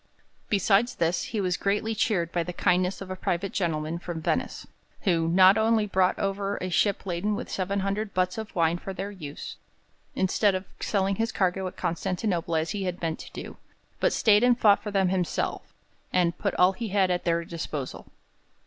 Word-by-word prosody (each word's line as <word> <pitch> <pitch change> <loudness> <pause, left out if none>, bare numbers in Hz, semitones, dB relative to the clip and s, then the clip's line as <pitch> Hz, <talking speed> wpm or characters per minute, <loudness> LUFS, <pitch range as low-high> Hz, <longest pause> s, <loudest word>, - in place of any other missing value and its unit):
Besides 205 +3 +3
this, 170 +1 0
he 220 - -3
was 180 -2 0
greatly 210 +3 0
cheered 195 -6 0
by 175 - 0
the 180 +1 -4
kindness 180 +2 +1
of 190 -1 -7
a - - -3
private 185 +1 -2
gentleman 165 -2 -1
from 175 -2 -5
Venice, 160 - -2 0.4
who 170 -5 +1
not 185 +4 +6
only 220 -1 +3
brought 190 -2 +2
over 195 0 -1
a 185 0 -4
ship 200 +3 +1
laden 195 +3 -1
with - - -6
700 200 +2 -1
butts 185 +3 0
of 220 0 -7
wine 170 0 +2
for 195 - -6
their 195 +2 -5
use, 150 -7 -8 0.6
instead 190 +1 +2
of 185 +1 -3
selling 195 -1 0
his 225 0 0
cargo 190 0 0
at - - -9
Constantinople 175 -1 -1
as 160 0 0
he 200 -2 -3
had 180 -1 -3
meant 165 -2 -2
to - - -10
do, - - -8 0.4
but - - +3
stayed 210 0 +4
and 245 -1 +5
fought 205 -2 +5
for 210 - -5
them 195 -2 +2
himself, 180 -2 -2 0.4
and 175 -2 +2
put - - -1
all 180 +1 +5
he 225 +4 -5
had 195 -2 +2
at 175 - -1
their 170 -1 0
disposal. 155 -5 -5
185 Hz, 190 wpm, -27 LUFS, 175-200 Hz, 0.6 s, not